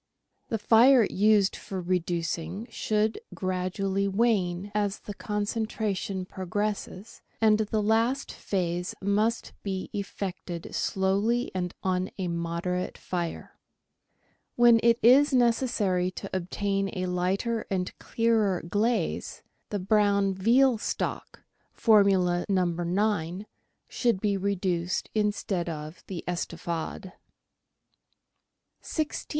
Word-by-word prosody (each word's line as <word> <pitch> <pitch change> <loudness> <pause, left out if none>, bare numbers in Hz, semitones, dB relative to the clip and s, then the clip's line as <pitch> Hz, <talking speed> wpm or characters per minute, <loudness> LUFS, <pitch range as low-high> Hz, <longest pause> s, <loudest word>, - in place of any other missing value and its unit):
The 225 - -1
fire 235 +4 +6
used 205 -1 +3
for 190 - -6
reducing 175 +1 -2
should 215 - 0 0.2
gradually 190 +1 -1
wane 195 -3 +1
as 205 -1 0
the 205 - -7
concentra 210 0 -2
tion 190 -1 -4
progresses, 200 +3 -4 0.2
and 215 -1 +4
the 215 0 0
last 230 +5 +1
phase 180 -2 -2
must 210 +4 0
be 190 -2 -4
effected 190 -4 -5
slowly 200 +6 0
and 180 -1 -3
on 185 0 0
a 185 -2 -2
moderate 170 +2 -2
fire. 175 -2 -5 1.0
When 240 -1 +6
it 230 0 +4
is 270 +4 +6
necessary 230 -7 +2
to 190 +1 -7
obtain 195 +2 -1
a 185 - -1
lighter 190 +6 -1
and 185 -2 -2
clearer 220 -5 +1
glaze, 220 +6 -1 0.3
the 205 - -2
brown 200 0 +2
veal 235 +5 +3
stock - - -4 0.3
(Formula 195 -5 +4
No. 185 -2 +3
9) 175 +1 -1 0.4
should 235 -6 0
be 205 0 +1
reduced 185 -3 -1
instead 205 -4 -1
of 155 +1 -7
the 185 -4 -5
" - - -36
Estouffade." 175 +1 -4
195 Hz, 105 wpm, -27 LUFS, 180-215 Hz, 1.0 s, fire